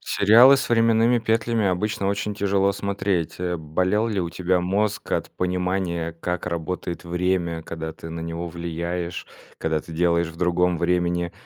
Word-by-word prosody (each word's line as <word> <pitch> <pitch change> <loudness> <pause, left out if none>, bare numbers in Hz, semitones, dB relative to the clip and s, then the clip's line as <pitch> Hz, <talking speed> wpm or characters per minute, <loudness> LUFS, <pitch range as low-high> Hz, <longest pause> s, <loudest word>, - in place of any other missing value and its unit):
Сериалы 120 +7 +6
с - - -2
временными 115 +1 +4
петлями 115 -1 +1
обычно 100 +2 -1
очень 100 +1 -2
тяжело 100 -1 +1
смотреть. 100 -4 -2
Э. 90 -1 -2
Болел 90 +8 0
ли 100 -4 -1
у 85 -1 -3
тебя 90 0 0
мозг 100 +3 -1
от - - -1
понимания 90 -2 -2
как 90 +1 -4
работает 85 +1 -4
время, 85 -1 -1
когда 80 -1 -6
ты 80 - -10
на 85 0 -5
него 85 +1 -4
влияешь, 85 +1 -4 0.3
когда 80 -1 0
ты 80 - -12
делаешь 85 0 +2
в 85 - -11
другом 90 0 +1
времени 85 0 0
90 Hz, 155 wpm, -23 LUFS, 85-100 Hz, 0.3 s, Сериалы